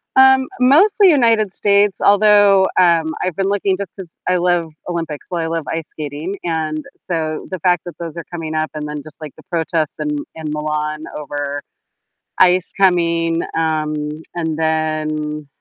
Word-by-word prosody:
Um, 265 Hz, 0 st, +6 dB
mostly 370 Hz, +10 st, +5 dB
United 230 Hz, -, +3 dB
States, 200 Hz, -1 st, +2 dB
although, 205 Hz, -1 st, +5 dB, 0.2 s
um, 170 Hz, -2 st, +4 dB, 0.2 s
I've 185 Hz, -3 st, -2 dB
been 195 Hz, +1 st, 0 dB
looking 200 Hz, -1 st, +1 dB
just 200 Hz, -2 st, -6 dB
'cause 190 Hz, -3 st, -8 dB, 0.2 s
I 180 Hz, -, +3 dB
love 175 Hz, -1 st, +2 dB, 0.2 s
Olympics, 165 Hz, -4 st, -4 dB
well, 170 Hz, -2 st, -2 dB
I -, -, -2 dB
love 165 Hz, -2 st, -3 dB
ice 160 Hz, -1 st, -3 dB
skating, 150 Hz, +4 st, -5 dB
and, 155 Hz, -2 st, -2 dB, 0.3 s
so, 160 Hz, -2 st, -2 dB
the 185 Hz, -, -3 dB
fact 175 Hz, 0 st, +2 dB
that 175 Hz, -, -8 dB
those 170 Hz, -1 st, -6 dB
are 170 Hz, -, -4 dB
coming 160 Hz, -2 st, -5 dB
up, 155 Hz, 0 st, -1 dB
and 150 Hz, -1 st, -5 dB
then 150 Hz, -1 st, -6 dB
just, 155 Hz, -1 st, -13 dB
like, 150 Hz, -3 st, -8 dB
the -, -, -16 dB
protests 160 Hz, -2 st, -1 dB
in 150 Hz, -1 st, -2 dB, 0.3 s
in 160 Hz, -, -8 dB
Milan 150 Hz, 0 st, -2 dB, 0.2 s
over 145 Hz, 0 st, -4 dB, 0.8 s
ICE 180 Hz, 0 st, +4 dB
coming, 170 Hz, -2 st, +2 dB, 0.2 s
um, 155 Hz, -1 st, 0 dB, 0.4 s
and 160 Hz, -2 st, -2 dB
then, 155 Hz, -1 st, -1 dB
165 Hz, 165 wpm, -18 LUFS, 155-190 Hz, 0.8 s, Um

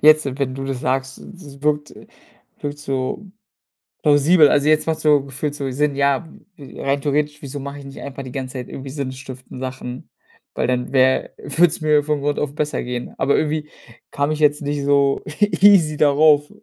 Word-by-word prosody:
jetzt, 155 Hz, +1 st, +6 dB
wenn 130 Hz, -2 st, -1 dB
du 135 Hz, 0 st, -5 dB
das 135 Hz, -2 st, -4 dB
sagst, 135 Hz, +1 st, -2 dB
es 145 Hz, -7 st, -13 dB
wirkt 150 Hz, 0 st, 0 dB, 0.7 s
wirkt 145 Hz, 0 st, -5 dB
so 135 Hz, +5 st, -3 dB, 0.8 s
plausibel. 150 Hz, +2 st, +5 dB
Also, 145 Hz, +1 st, +2 dB
jetzt 155 Hz, 0 st, +3 dB
macht 160 Hz, -1 st, -1 dB
so, 150 Hz, -3 st, +3 dB
gefühlt 140 Hz, +2 st, -4 dB
so 140 Hz, -2 st, -3 dB
Sinn. 140 Hz, +2 st, 0 dB
Ja, 140 Hz, +3 st, +1 dB, 0.3 s
äh, 140 Hz, -3 st, -11 dB
rein 140 Hz, +1 st, 0 dB
theoretisch, 150 Hz, +1 st, -1 dB
wieso 140 Hz, 0 st, -6 dB
mache 140 Hz, +1 st, -7 dB
ich -, -, -12 dB
nicht 135 Hz, 0 st, -10 dB
einfach 140 Hz, 0 st, -7 dB
die 130 Hz, -2 st, -9 dB
ganze 130 Hz, -1 st, -5 dB
Zeit 125 Hz, -2 st, -6 dB
irgendwie 135 Hz, 0 st, -8 dB
sinnstiftende 130 Hz, -2 st, -7 dB
Sachen, 130 Hz, -1 st, -6 dB, 0.5 s
weil -, -, 0 dB
dann 125 Hz, 0 st, -1 dB
wäre 130 Hz, -1 st, +3 dB
würde 175 Hz, +2 st, +3 dB
es 160 Hz, -, -4 dB
mir 150 Hz, -1 st, +3 dB
von 150 Hz, -1 st, -1 dB
Grund 145 Hz, +1 st, -1 dB
auf 145 Hz, -1 st, -2 dB
besser 150 Hz, 0 st, -2 dB
gehen. 125 Hz, 0 st, -5 dB
Aber 140 Hz, -, +2 dB
irgendwie 150 Hz, 0 st, -1 dB, 0.4 s
kam 145 Hz, +1 st, -1 dB
ich 155 Hz, -, -1 dB
jetzt 150 Hz, -1 st, +2 dB
nicht 145 Hz, 0 st, -2 dB
so 140 Hz, -1 st, +3 dB, 0.4 s
easy 185 Hz, -7 st, +6 dB
darauf. 145 Hz, 0 st, +4 dB
145 Hz, 190 wpm, -20 LUFS, 135-150 Hz, 0.8 s, jetzt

